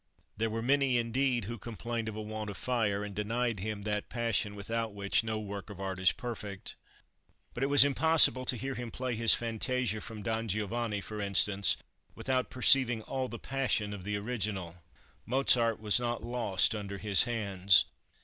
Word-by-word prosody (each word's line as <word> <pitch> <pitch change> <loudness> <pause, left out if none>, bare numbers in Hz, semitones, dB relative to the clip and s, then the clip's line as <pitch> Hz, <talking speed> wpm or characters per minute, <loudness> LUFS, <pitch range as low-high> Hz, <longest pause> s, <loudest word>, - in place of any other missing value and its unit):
There 115 +1 -1
were 115 +1 -3
many, 135 0 +3
indeed, 120 0 0
who 115 +2 -6
complained 115 +1 -4
of 105 - -7
a 110 - -4
want 110 0 -5
of 100 - -7
fire, 105 -5 0
and 105 -1 -6
denied 115 +2 -1
him 105 +1 -4
that 105 0 -2
passion 115 -4 -1
without 115 +1 -3
which 100 +2 +1
no 110 -1 -2
work 100 -1 -6
of 100 -3 -10
art 95 -1 -4
is 95 -1 +5
perfect. 105 -5 -7 0.8
But 120 - -6
it 135 - +2
was 145 -1 +7
impossible 145 -2 +4
to 125 - 0
hear 135 +4 -4
him 120 -1 -5
play 125 +2 -3
his 115 0 +4
fantasia 115 -1 -2
from 110 -2 -8
"Don 115 +2 -2
Giovanni," 110 +1 -2
for 105 +1 -6
instance, 100 -1 +3 0.4
without 130 -1 -1
perceiving 125 -2 +4
all 130 +2 -3
the 120 - -7
passion 125 -6 -1
of 100 -3 -8
the 105 +1 -2
original. 100 -6 -3 0.5
Mozart 120 -3 +2
was 105 +1 +2
not 120 -1 -2
lost 115 -5 +2
under 100 -2 -5
his 100 0 +5
hands. 100 -5 +3
110 Hz, 180 wpm, -31 LUFS, 105-120 Hz, 0.8 s, was